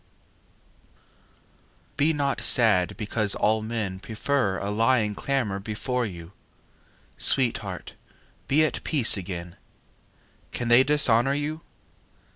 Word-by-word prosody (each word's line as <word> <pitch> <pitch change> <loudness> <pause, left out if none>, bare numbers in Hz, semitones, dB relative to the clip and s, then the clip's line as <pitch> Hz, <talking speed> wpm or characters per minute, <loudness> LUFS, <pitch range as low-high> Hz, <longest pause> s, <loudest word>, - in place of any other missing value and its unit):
XIX - - -36 1.0
Be 150 +3 +2
not 140 -2 -2
sad 105 -7 +4
because 105 -2 -1
all 110 +1 +1
men 110 -4 -4
Prefer 110 -1 -2
a 100 - -4
lying 110 0 +1
clamour 110 -5 -2
before 115 +4 -3
you: 85 -3 -10 0.9
Sweetheart, 110 -8 +1 0.5
be 155 +3 +3
at - - -4
peace 140 -8 +4
againâ 85 -3 -6 0.9
Can 120 -1 -4
they 120 +2 +6
dishonour 135 -3 +2
you? 150 +2 -4
115 Hz, 105 wpm, -25 LUFS, 100-135 Hz, 1.0 s, they